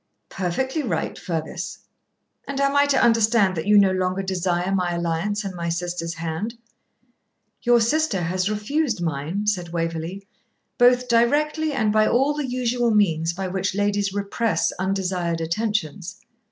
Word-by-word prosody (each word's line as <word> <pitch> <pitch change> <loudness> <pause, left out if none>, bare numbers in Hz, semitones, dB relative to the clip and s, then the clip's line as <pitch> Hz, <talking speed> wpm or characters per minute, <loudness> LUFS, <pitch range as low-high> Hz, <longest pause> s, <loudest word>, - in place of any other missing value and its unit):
'Perfectly 260 - -2
right, 190 - -2
Fergus.' 160 -3 -4 0.7
'And 275 0 -3
am 275 0 +2
I 285 0 +5
to 280 - +3
understand 225 -4 +3
that 160 +2 -4
you 210 0 +6
no 195 -2 +5
longer 185 +1 -1
desire 180 0 -1
my 180 -2 0
alliance 170 +5 -1
and 195 -1 -5
my 170 -1 -3
sister's 170 0 -3
hand?' 170 +8 -4 1.1
'Your 240 0 +4
sister 235 -1 +1
has 185 +3 -1
refused 225 - -1
mine,' 165 +5 -2
said 185 -5 -1
Waverley, 165 +3 -3 0.5
'both 250 +1 +5
directly 295 +7 +2
and 220 -6 +1
by 215 0 +4
all 270 +4 +2
the 290 -3 -3
usual 245 -1 0
means 170 -6 +2
by 190 +2 -4
which 190 +1 -2
ladies 205 -1 0
repress 205 +3 0
undesired 185 -3 -1
attentions.' 180 0 -2
195 Hz, 145 wpm, -23 LUFS, 175-235 Hz, 1.1 s, you